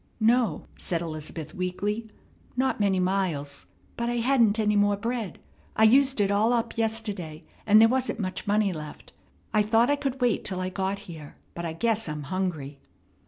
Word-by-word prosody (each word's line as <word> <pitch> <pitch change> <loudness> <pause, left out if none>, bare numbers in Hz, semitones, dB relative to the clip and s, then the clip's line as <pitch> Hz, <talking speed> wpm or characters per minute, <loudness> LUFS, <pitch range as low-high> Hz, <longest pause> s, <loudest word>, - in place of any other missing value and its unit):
"No," 235 +1 +2
said 170 - -1
Elizabeth, 155 -1 -6
weakly, 205 +5 -3 0.5
"not 260 -2 +1
many 195 -2 +2
miles; 180 -7 -1 0.3
but 235 0 -2
I 240 - -1
hadn't 235 -3 +3
any 210 -1 +2
more 205 0 +3
bread. 230 -1 -3 0.4
I 220 - +3
used 265 +3 +5
it 200 -1 +2
all 215 +4 +3
up 235 -2 -1
yesterday, 210 -8 -2 0.2
and 210 +1 +7
there 225 - +8
wasn't 255 -1 -1
much 185 +1 -4
money 205 -2 +2
left. 150 -2 -9 0.4
I 215 - +4
thought 225 +5 +3
I - - +4
could 270 -2 -3
wait 245 -3 +1
till 185 -2 -4
I 185 0 -2
got 190 +1 -2
here, 155 -4 -10 0.2
but 170 - -5
I 165 - -3
guess 225 +1 0
I'm 150 -1 -4
hungry." 150 -4 -3
205 Hz, 175 wpm, -26 LUFS, 180-230 Hz, 0.5 s, there